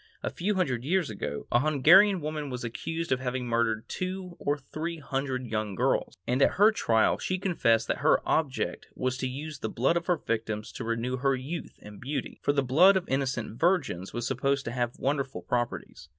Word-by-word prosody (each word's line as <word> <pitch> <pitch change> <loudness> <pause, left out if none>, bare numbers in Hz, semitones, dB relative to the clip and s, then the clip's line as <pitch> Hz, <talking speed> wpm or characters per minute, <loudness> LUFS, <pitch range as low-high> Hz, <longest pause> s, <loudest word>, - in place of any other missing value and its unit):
A - - -2
few 205 +4 -1
hundred 130 -10 0
years 170 -1 +1
ago, 75 -8 -5
a 120 - +5
Hungarian 165 +7 +5
woman 150 -1 -4
was 125 -1 -5
accused 165 +8 -4
of 130 - +2
having 125 -1 -3
murdered 115 -2 0
two 185 -1 -4
or 145 +1 0
three 155 +4 -5
hundred 135 -3 -3
young 110 -3 -3
girls, - - 0
and 125 +3 0
at - - +5
her 210 +3 +6
trial 115 - +2
she 185 - -1
confessed 165 - +2
that - - -1
her - - +4
object 150 -4 -1
was 130 0 -1
to 130 - -2
use 145 +2 -6
the 110 - -3
blood 135 +10 +1
of 170 - -4
her 180 -2 +3
victims 110 -5 -3
to - - -6
renew 115 +3 -2
her 135 +1 +2
youth 145 +6 -6
and 105 -1 -11
beauty, 135 +1 -4
for - - +2
the 140 -1 +1
blood 175 +10 +6
of 185 - -3
innocent 130 -4 -2
virgins 160 - +1
was 120 0 -3
supposed 135 +2 0
to 115 - -3
have 120 -1 -2
wonderful 140 -1 -2
properties. 120 -10 -3
135 Hz, 200 wpm, -28 LUFS, 120-160 Hz, -, her